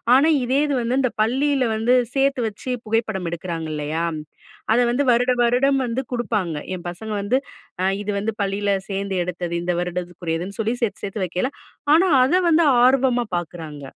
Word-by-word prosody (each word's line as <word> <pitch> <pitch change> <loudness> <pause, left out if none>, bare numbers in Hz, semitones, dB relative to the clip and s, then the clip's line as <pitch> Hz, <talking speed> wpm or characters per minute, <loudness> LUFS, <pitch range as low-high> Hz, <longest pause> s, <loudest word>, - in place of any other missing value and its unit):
ஆனா 285 +5 +5
இதே 260 +3 +1
இது 285 - 0
வந்து 240 +2 0
இந்த 255 -3 +1
பள்ளியில 265 +3 +1
வந்து, 230 +3 +3 0.2
சேர்த்து 275 -2 +2
வச்சு 220 +4 -6
புகைப்படம் 215 -5 -1
எடுக்கிறாங்க 170 -1 -4
இல்லையா. 150 +2 -2 0.7
அதை 240 - +4
வந்து 275 +4 +1
வருட 245 +2 +3
வருடம் 265 +3 +3
வந்து 240 +3 -2
குடுப்பாங்க. 210 -9 -1 0.2
என் 180 - -10
பசங்க 215 +5 -7
வந்து 210 +6 +1 0.4
அ - - +1 0.2
இது 210 - -2
வந்து 220 +2 -2
பள்ளியில 200 +1 -1 0.2
சேர்ந்து 195 0 -2
எடுத்தது. 175 -1 -4
இந்த 180 0 0
வருடத்துக்குரியதுன்னு 175 +1 -4
சொல்லி 225 +2 0
சேர்த்து 225 - -2
சேர்த்து 195 -1 -3
வைக்கல. 180 +9 -2 0.4
ஆனா 360 +4 +4 0.2
அத 350 +8 +3
வந்து 330 0 +4 0.2
ஆர்வமா 255 -2 +3
பார்க்குறாங்க. 160 -4 -7
220 Hz, 165 wpm, -22 LUFS, 180-255 Hz, 0.7 s, ஆனா